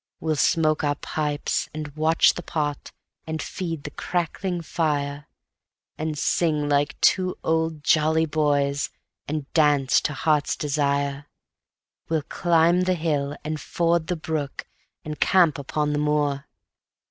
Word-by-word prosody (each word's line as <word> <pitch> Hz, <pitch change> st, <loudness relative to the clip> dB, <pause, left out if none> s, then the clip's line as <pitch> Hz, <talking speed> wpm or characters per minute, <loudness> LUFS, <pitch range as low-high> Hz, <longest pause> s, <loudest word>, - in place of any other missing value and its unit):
We'll 160 Hz, -1 st, 0 dB
smoke 155 Hz, +1 st, +2 dB
our 145 Hz, -1 st, +1 dB
pipes 150 Hz, 0 st, -2 dB
and 155 Hz, -1 st, -4 dB
watch 155 Hz, +1 st, +4 dB
the -, -, -6 dB
pot, 150 Hz, -4 st, -3 dB, 0.4 s
and 160 Hz, 0 st, -3 dB
feed 165 Hz, -5 st, -4 dB
the 150 Hz, -, -6 dB
crackling 175 Hz, +2 st, -2 dB
fire, 145 Hz, -3 st, -2 dB, 0.7 s
And 155 Hz, -1 st, -3 dB
sing 150 Hz, -2 st, +1 dB
like 145 Hz, 0 st, +1 dB
two 185 Hz, -1 st, +3 dB
old 160 Hz, -2 st, 0 dB
jolly 160 Hz, +1 st, +3 dB
boys, 145 Hz, -2 st, +1 dB, 0.4 s
and 150 Hz, -1 st, -3 dB
dance 145 Hz, -4 st, +4 dB
to 150 Hz, -, -2 dB
heart's 150 Hz, 0 st, +1 dB
desire; 140 Hz, -1 st, -1 dB, 0.8 s
We'll 160 Hz, -2 st, 0 dB
climb 170 Hz, +2 st, +2 dB
the 185 Hz, 0 st, +2 dB
hill 150 Hz, -3 st, -1 dB
and 155 Hz, 0 st, -3 dB
ford 170 Hz, -1 st, 0 dB
the 180 Hz, -, -1 dB
brook 155 Hz, -3 st, -4 dB, 0.4 s
and 150 Hz, 0 st, -5 dB
camp 170 Hz, -6 st, +4 dB
upon 150 Hz, +1 st, -1 dB
the 145 Hz, -, 0 dB
moor 150 Hz, -1 st, 0 dB
155 Hz, 135 wpm, -24 LUFS, 145-160 Hz, 0.8 s, watch